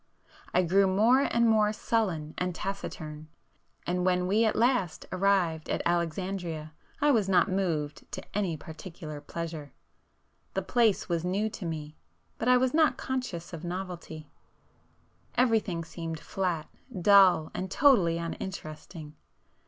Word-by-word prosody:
I 180 - +3
grew 190 +3 +4
more 220 +7 +4
and 235 0 +3
more 215 -2 +4
sullen 185 -9 -1
and 180 -1 -1
taciturn, 155 -6 -5 0.6
and 180 0 -1
when 180 0 +2
we 210 +5 +3
at 220 - +1
last 230 -8 +1
arrived 185 -4 +1
at - - -1
Alexandria 170 -2 -2 0.3
I 290 0 +4
was 215 -7 +2
not 185 0 +4
moved 165 -6 -2
to - - -5
any 190 -6 0
particular 160 -1 -9
pleasure. 160 -2 -6 0.8
The 195 - 0
place 225 0 +2
was 170 -2 -1
new 200 +4 0
to 220 -4 -7
me, 155 -1 -6 0.4
but 225 - -2
I 250 0 +6
was 255 0 +1
not 315 -1 +3
conscious 245 -11 -4
of 165 0 -7
novelty,—everything 180 - -4
seemed 165 -1 -6
flat, 175 -3 -2 0.3
dull, 185 -4 +6
and 185 +1 -4
totally 195 - +4
uninteresting. 165 -2 -6
180 Hz, 130 wpm, -29 LUFS, 165-210 Hz, 0.8 s, I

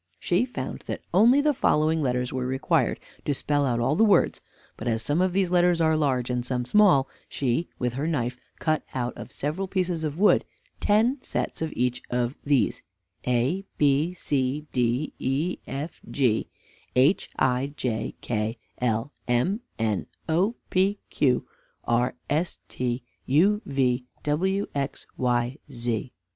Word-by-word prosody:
She 180 +7 +2
found 250 - -5
that - - -4
only 235 +9 +6
the 300 0 +3
following 160 - +2
letters 125 -2 0
were 130 -1 -1
required 130 - +1 0.2
to 145 - 0
spell 145 +1 +1
all 120 +3 +1
the 220 - +4
words; 205 -5 +4 0.3
but - - -6
as 115 -1 0
some 150 +4 +1
of 185 0 +2
these 185 -1 +1
letters 175 -1 +4
are 160 -1 +3
large, 130 -5 +1
and 125 -1 -1
some 125 0 -2
small, 140 -4 +5 0.2
she 135 +5 0
with 125 -2 -1
her 140 +5 -2
knife 125 -6 -1 0.2
cut 155 -1 +1
out 125 -1 -2
of - - -9
several 155 +7 -2
pieces 180 -4 -1
of 150 0 -2
wood 205 +3 +5 0.4
ten 230 +6 +3
sets - - -3
of 160 -1 -1
each 125 0 0
of 125 +2 0
these: 140 -3 +2 0.5
a 125 +10 +1
b 150 +5 +3
c 145 -2 -1
d 125 +4 0
e 145 +7 -1
f 145 +5 -5
g 125 -6 +1 0.5
h 135 +9 +3
i 130 +2 +1
j 115 -4 -2
k 110 0 -2 0.2
l 115 +2 0 0.2
m 125 - +1 0.2
n 110 -4 0 0.2
o 180 +8 +2 0.2
p 195 +2 +3
q 125 -4 +2 0.4
r 120 +1 +1
s 160 +4 0
t 125 0 -2 0.2
u 195 +10 +4
v 125 -2 +1 0.2
w 190 +7 +1
x 140 -1 -3
y 125 +1 0
z. 120 -1 -2
140 Hz, 155 wpm, -26 LUFS, 125-175 Hz, 0.5 s, only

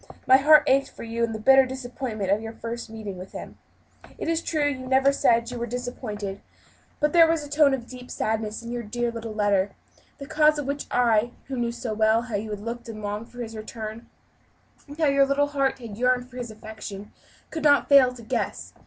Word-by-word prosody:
My 260 - +7
heart 300 +3 +7
ached 275 +1 +3
for - - -11
you 230 0 -2
in 230 - 0
the 220 - -4
bitter 270 +5 +6
disappointment 245 -6 -4
of 205 +2 +2
your 225 0 -6
first 235 +1 -6
meeting 215 -4 -7
with 185 - -10
him. - - -9 0.6
It - - -5
is 330 0 +1
true 310 -3 0
you 260 -3 -3
never 265 +1 +4
said 235 -4 +3
that 235 - -8
you 245 - -5
were 235 - -3
disappointed, 215 -5 -5 0.6
but 300 0 +1
there 335 -1 +7
was 325 -2 +1
a - - -9
tone 290 -2 +4
of 240 -3 -8
deep 250 0 -11
sadness 220 0 -2
in 235 - -6
your 240 0 -3
dear 240 +2 -2
little 230 -1 -6
letter, 205 -2 +1 0.4
the 280 - -8
cause 305 +1 +3
of 295 - -3
which 280 +1 -3
I 240 -1 +2 0.2
who 270 - -3
knew 235 -1 0
so 235 -1 -4
well 220 +2 +3
how 240 -3 -5
you 210 +2 -3
had 210 -1 -5
looked 235 +2 -6
and 215 -1 -8
longed 210 +3 -4
for 245 0 -7
his 225 -1 -8
return, 220 +1 -7 0.8
and 290 +1 -10
how 325 - +2
your 275 -1 +4
little 285 +1 +2
heart 275 -2 0
yearned 250 +2 -1
for 250 - -11
his 245 -2 -5
affection 215 -2 -9 0.4
could 320 - -4
not 285 -1 +5
fail 275 -3 +7
to 245 -2 -12
guess. 220 - -3
240 Hz, 225 wpm, -25 LUFS, 220-270 Hz, 0.8 s, My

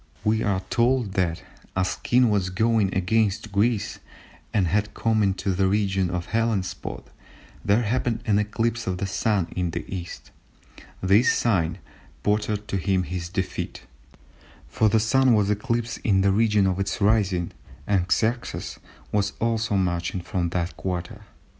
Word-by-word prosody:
We 110 +1 +2
are 100 -4 0
told 120 -3 +2
that 90 -1 0 0.3
"As 95 0 +1
the - - -21
king 125 -2 +3
was 95 -3 +1
going 110 +1 +2
against 105 +2 +1
Greece, 105 +2 0 0.5
and 100 -3 +2
had 105 +4 0
come 110 -1 +1
into 95 -1 0
the 95 +1 +2
region 95 -2 +1
of 90 -1 -2
the - - -17
Hellespont, 110 -5 -2 0.6
there 105 +4 +3
happened 115 0 -1
an 105 -2 +3
eclipse 115 +2 -1
of 90 -1 -1
the 100 - -2
Sun 100 -2 0
in 90 -2 0
the - - -4
East; 90 -2 -7 0.7
this 100 +6 +4
sign 90 -7 +1 0.5
portended 105 0 0
to 100 - 0
him 95 +1 +1
his 90 -1 -5
defeat, 95 0 -4 0.8
for 110 - +2
the 110 - +3
Sun 130 +2 +4
was 105 -1 +2
eclipsed 115 +2 -1
in 95 -3 +3
the 100 0 +3
region 105 -1 +3
of 95 0 0
its 100 0 -2
rising, 100 -4 +2 0.3
and 95 -1 0
Xerxes 115 +2 -1 0.3
was 100 -1 0
also 115 -2 0
marching 90 -1 -1
from 85 0 -2
that 85 -1 -2
quarter." 95 +4 -4
100 Hz, 155 wpm, -25 LUFS, 95-110 Hz, 0.8 s, this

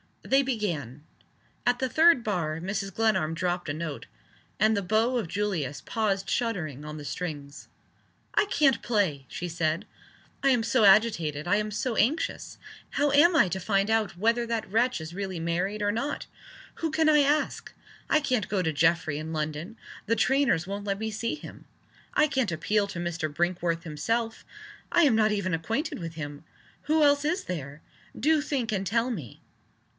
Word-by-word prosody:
They 270 +1 +3
began. 170 - -3 0.6
At 245 0 +2
the 260 - 0
third 320 -3 +5
bar 165 -7 -1
Mrs. 195 +3 -3
Glenarm 190 -8 +1
dropped 175 -1 -2
a - - -1
note 155 -2 -5 0.5
and 215 +2 +4
the 200 - 0
bow 220 +6 +1
of 225 - -2
Julius 170 -8 -2
paused 200 -3 -1
shuddering 155 - -2
on 150 0 -6
the 145 - -8
strings. 145 -4 -6 0.7
"I - - +3
can't 290 -9 +2
play!" 190 - 0
she 175 +9 -5
said. 165 +2 -1 0.6
"I 275 - +3
am 245 -4 +3
so 225 -1 +3
agitated; 175 -7 +3
I 205 - +3
am 210 0 -1
so 225 +3 -2
anxious. 285 +9 0 0.3
How 290 0 +1
am 325 +5 +6
I 205 - +5
to 190 - -2
find 195 +2 +1
out 220 -5 +1
whether 230 +4 +1
that 230 -4 -2
wretch 230 -3 +1
is 160 +1 -7
really 190 -2 -4
married 180 +6 -1
or 205 - +2
not? 255 +7 -3 0.5
Who 325 - -2
can 315 0 +3
I 300 -1 +6
ask? 290 +2 +1 0.4
I 310 - +4
can't 255 -8 0
go 195 -2 +1
to 160 -3 -1
Geoffrey 155 -1 +2
in 160 +1 -5
London 155 +6 -4 0.3
the 230 - +1
trainers 250 - +2
won't 200 +2 -5
let 200 -1 -1
me 220 +1 -3
see 230 +5 -2
him. - - -11 0.5
I 305 - +5
can't 260 - 0
appeal 200 +6 0
to 180 - -6
Mr. 170 -3 -3
Brinkworth 170 +1 -1
himself 225 +9 -2 0.5
I 345 - +5
am 280 -6 +5
not 215 -1 +3
even 200 -3 -1
acquainted 225 - -2
with 165 -2 -6
him. 145 -1 -7 0.4
Who 310 +1 +3
else 285 0 +4
is 355 +6 0
there? 145 -3 -6 0.4
Do 305 +4 +3
think, 270 -6 -2
and 195 -2 -1
tell 230 +5 +1
me!" 155 - -7
200 Hz, 180 wpm, -27 LUFS, 165-240 Hz, 0.7 s, am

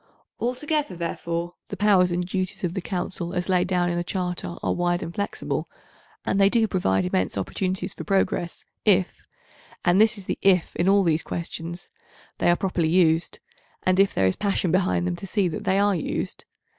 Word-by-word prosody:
Altogether, 255 - -1
therefore, 170 0 -3
the - - -6
powers 195 -4 +4
and 175 +1 -1
duties 185 +1 -3
of 175 -2 -1
the 190 - -3
Council 175 -1 -4
as 180 +1 -2
laid 180 -1 +3
down 180 -1 +1
in 175 0 -1
the - - -1
Charter 180 -1 -3
are - - +1
wide 175 0 0
and 170 - -6
flexible, 200 +2 -3 0.6
and 195 - +1
they 195 - +6
do 225 0 +3
provide 95 - +1
immense 95 0 0
opportunities 185 - -2
for - - -7
progress 190 -3 -1 0.2
if—and 185 -1 0
this 220 +1 +4
is 195 - -8
the - - -3
"if" 185 -3 +3
in 175 +2 +2
all 200 0 +5
these 165 -2 +2
questions—they 170 +1 -5
are 175 - +5
properly 180 -4 0
used, 165 -1 +2 0.5
and 185 0 +2
if 195 0 +5
there 95 - +1
is 95 - +2
passion 195 -4 0
behind 90 - +2
them 90 -1 -1
to - - -8
see 195 0 +1
that 160 - -5
they 190 - +2
are 205 0 +3
used. 165 - -3
180 Hz, 185 wpm, -25 LUFS, 170-195 Hz, 0.6 s, they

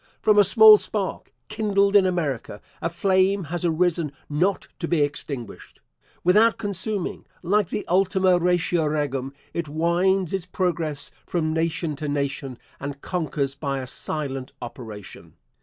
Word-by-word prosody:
From 210 -1 +4
a - - +8
small 215 +1 +8
spark, 200 -3 -4 0.2
kindled 205 -2 +1
in 195 -2 +6
America, 145 - -2 0.2
a 165 - 0
flame 190 +2 +2
has 175 +3 -4
arisen 170 -2 +1 0.2
not 175 +7 0
to 170 - -3
be 165 -3 +1
extinguished. 140 -5 -6 0.4
Without 215 +6 +4
consuming, 200 -1 -3 0.2
like 200 +1 +2
the - - -4
Ultima 185 0 +3
Ratio 175 -2 +1
Regum, 140 -3 -2 0.2
it 170 -3 -3
winds 175 +4 +1
its 190 -3 -3
progress 170 -6 -2 0.2
from 155 -3 -1
nation 165 -1 -1
to 150 - -4
nation, 140 -2 -3 0.2
and 140 0 -6
conquers 150 -6 -2
by 140 -1 -3
a 130 - -4
silent 135 0 -4
operation. 110 -4 -10
170 Hz, 140 wpm, -24 LUFS, 145-190 Hz, 0.4 s, a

